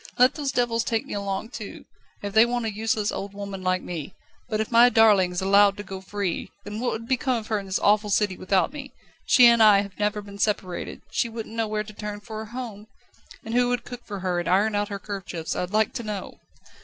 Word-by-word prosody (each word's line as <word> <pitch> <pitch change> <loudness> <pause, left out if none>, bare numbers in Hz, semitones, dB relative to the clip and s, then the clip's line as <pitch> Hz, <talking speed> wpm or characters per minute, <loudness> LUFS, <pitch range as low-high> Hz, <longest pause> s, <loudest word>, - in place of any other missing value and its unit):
Let 250 +1 +6
those 285 -3 -2
devils 240 -3 +1
take 225 -2 -1
me - - -7
along 200 +2 -3
too, 220 -6 -8 0.4
if 200 -1 -4
they 220 - +7
want 240 0 -1
a 220 - -2
useless, 215 0 0
old 200 0 -6
woman 200 -1 -6
like 185 0 0
me. 170 -1 -6 0.3
But 215 -2 -1
if 220 - -2
my 240 +1 +7
darling 215 -6 +5
is 180 - -2
allowed 200 +1 +5
to 205 - -6
go 190 -2 -7
free, 195 -2 -3
then 205 +1 -6
what 245 +1 0
would 230 +1 -6
become 255 0 +1
of 220 -1 -6
her 215 -2 +1
in 195 - -9
this 190 - 0
awful 210 +1 +3
city 205 -1 +1
without 185 - +1
me? 280 -2 -8 0.3
She 250 - +7
and 235 -1 +6
I 210 -2 +7
have 200 0 -9
never 210 0 0
been 200 0 -11
separated; 195 -4 -2
she 235 - 0
wouldn't 225 -1 -7
know 225 -1 -1
where 210 0 -2
to 215 0 -12
turn 210 0 -6
for 215 +1 -7
a 220 - -8
home. 225 -4 -7 0.6
And 225 - -5
who 245 0 +3
would 245 -1 -1
cook 245 -1 -9
for 200 -2 -7
her 180 -1 0
and 175 - -4
iron 205 +4 +3
out 205 +1 0
her 200 - -4
kerchiefs, 190 -5 -5
I'd 180 - -2
like 215 +2 +1
to 250 - -4
know?" 210 -3 -6
210 Hz, 240 wpm, -25 LUFS, 200-230 Hz, 0.6 s, they